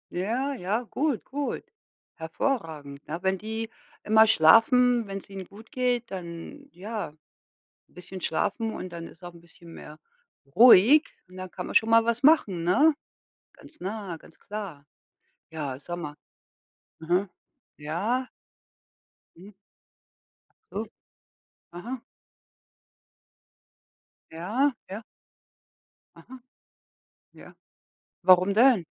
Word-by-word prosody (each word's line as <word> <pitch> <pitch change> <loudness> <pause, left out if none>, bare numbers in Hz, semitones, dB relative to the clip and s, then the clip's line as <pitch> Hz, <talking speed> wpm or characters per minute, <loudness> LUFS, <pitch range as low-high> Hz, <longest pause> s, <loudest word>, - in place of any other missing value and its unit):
Ja, 235 +10 -1
ja, 215 -1 -2
gut, 275 +2 -2
gut. 285 +1 -4 0.5
Hervorragend, 160 - -3
ne? 165 +3 -4
Wenn 190 0 +1
die 220 +3 -5 0.3
immer 220 +1 +5
schlafen, 225 +6 +5
wenn's 195 0 -7
ihnen 195 -1 -7
gut 210 +5 -15
geht, 250 -3 -1
dann 185 - -8
ja 205 -2 -6 0.7
bisschen 180 +1 -10
schlafen 220 +8 -1
und 185 - -6
dann 165 -1 -7
ist 170 - -17
auch 175 0 -8
'n 170 - -16
bisschen 170 0 -16
mehr 150 +1 -11 0.6
ruhig. 245 - +8 0.2
Und 185 0 -15
dann 185 0 -6
kann 180 0 -7
man - - -7
schon 225 - +4
mal 230 0 +5
was 235 +1 0
machen, 240 - +4
ne? 285 - +4 0.6
Ganz - - -16
nah, 195 -1 -5
ganz 160 - -19
klar. 195 -9 -7 0.7
Ja, 145 -5 -5
sag 175 +4 -6
mal 150 -4 -6 0.8
mhm. 175 +5 0 0.5
Ja. 205 +13 -2 1.1
Hm. 190 +4 -13 1.2
U 210 +3 -3 0.9
aha. 230 +9 -7 2.3
Ja, 225 - 0 0.2
ja. 200 +4 -6 1.1
Aha. 260 +1 -13 0.9
Ja. - - -14 0.7
Warum 185 +2 +5
denn? 235 -4 +5
195 Hz, 110 wpm, -26 LUFS, 175-235 Hz, 2.3 s, ruhig